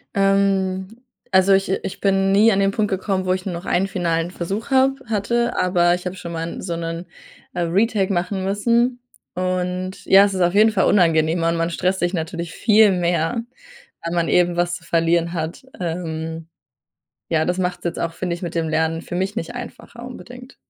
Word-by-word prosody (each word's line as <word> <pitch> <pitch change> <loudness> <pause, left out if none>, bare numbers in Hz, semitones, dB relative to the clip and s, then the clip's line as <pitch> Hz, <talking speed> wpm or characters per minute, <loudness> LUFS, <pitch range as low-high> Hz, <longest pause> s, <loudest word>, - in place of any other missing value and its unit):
Ähm, 195 -1 +2 0.4
also 190 +1 +5
ich 195 -1 +2
äh, 190 - 0
ich - - -5
bin 195 -1 +2
nie 215 +3 +5
an 195 - +1
den 195 0 +2
Punkt 210 0 0
gekommen, 190 0 -1
wo 185 - +2
ich 185 0 -4
nur 190 - -3
noch 170 +2 -6
einen 190 +2 +1
finalen 170 -2 -1
Versuch 195 +7 -4
habe 265 0 +3
hatte, 235 +3 0
aber 175 -1 +3
ich 180 +1 -9
habe 180 - -3
schon 170 -2 -7
mal 165 0 -5
so 175 -2 -3
'nen, 165 +1 -5 0.5
äh, 175 - -2
Retake 195 +3 +1
machen 185 +2 -1
müssen. 235 +5 +1 0.4
Und, 185 0 -3
ja, 195 +1 +7
es 200 -1 -2
ist 185 - -1
auf 175 0 +3
jeden 215 +2 +5
Fall 195 -3 +2
unangenehmer. 165 -3 +3
Man 165 - +1
man 165 0 0
stresst 185 +2 0
sich 175 +1 0
natürlich 170 0 -4
viel 215 -1 +5
mehr, 175 +4 0 0.6
weil 170 +1 -3
man 170 -1 +1
eben 175 -1 +2
was 175 0 +1
zu 165 - -9
verlieren 170 +1 +1
hat, 160 +6 -4
ähm, 165 -2 -4 0.8
ja, 160 -1 +1
das 180 +2 -1
machts 180 -1 -2
jetzt 170 - -2
auch, 165 -1 -2
finde 175 +1 -3
ich, 175 - -10
mit 170 -1 -4
dem 160 -1 0
Lernen, 160 +1 0
für - - -8
mich, 190 +3 -1
nicht 165 +8 -4
einfacher, 240 0 -9
unbedingt. 250 +1 -11
185 Hz, 200 wpm, -21 LUFS, 170-195 Hz, 0.8 s, ja